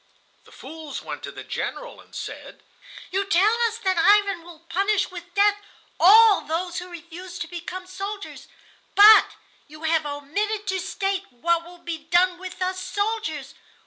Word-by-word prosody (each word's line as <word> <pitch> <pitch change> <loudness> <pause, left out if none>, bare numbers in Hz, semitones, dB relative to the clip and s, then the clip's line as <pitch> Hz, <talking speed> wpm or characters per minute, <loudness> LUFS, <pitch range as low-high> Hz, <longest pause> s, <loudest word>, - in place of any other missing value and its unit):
The - - -19
fools 315 -2 -9
went - - -7
to - - -7
the - - -9
General; - - -5
and - - -18
said: - - -8 0.5
"You 390 +2 0
tell 395 +2 +3
us 450 0 -5
that 375 -4 0
Ivan 400 0 +4
will 335 -1 -15
punish 395 +3 0
with 350 -1 -10
death 410 0 +3 0.4
all 425 +4 +7
those 345 +3 -3
who 360 0 -9
refuse 350 +1 -9
to 335 - -5
become 350 +2 -7
soldiers, 395 +2 -7 0.5
but 420 +2 +8 0.3
you 310 +2 -13
have 320 -1 +1
omitted 400 +10 -3
to 380 0 0
state 390 +1 -2
what 335 +7 0
will 350 +1 -13
be 340 -2 -6
done 350 +3 +2
with 370 0 -6
us 370 0 -2
soldiers. 405 -10 -3
365 Hz, 160 wpm, -24 LUFS, 335-400 Hz, 0.5 s, but